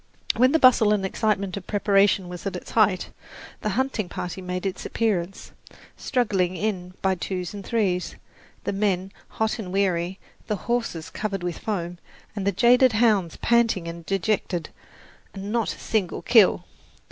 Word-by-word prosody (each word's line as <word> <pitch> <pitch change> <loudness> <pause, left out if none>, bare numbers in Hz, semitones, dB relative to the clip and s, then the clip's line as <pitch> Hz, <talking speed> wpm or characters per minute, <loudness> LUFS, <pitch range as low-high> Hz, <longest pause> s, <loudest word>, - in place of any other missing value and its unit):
When 255 +3 +4
the 320 - +4
bustle 240 -7 +6
and 200 -2 0
excitement 200 -1 0
of 190 - -8
preparation 200 -2 +3
was 180 +2 -6
at 195 - -3
its 180 - -8
height, 205 -5 +2 0.5
the 215 - -1
hunting 260 -8 -1
party 180 +2 -5
made 180 +1 -4
its 190 - -3
appearance, 195 -5 -2 0.4
struggling 190 -8 0
in 185 -2 -3
by 190 0 +3
twos 180 0 -4
and 200 -1 -7
threes, 190 -5 -1 0.5
the - - -2
men 195 -2 0 0.2
hot 220 +1 -2
and 185 -4 -5
weary, 185 -2 0 0.3
the 210 - 0
horses 230 -9 -2
covered 195 -4 -3
with 175 -2 -3
foam, 175 -5 -3 0.4
and 200 -2 -3
the - - +4
jaded 245 +5 +5
hounds 210 -7 +2
panting 230 -7 +2
and 170 0 -7
dejected 195 -3 -1 0.7
and 195 +1 -5
not 230 -1 0
a - - -17
single 210 -6 -1
kill! 200 -6 +5
195 Hz, 160 wpm, -24 LUFS, 180-220 Hz, 0.7 s, bustle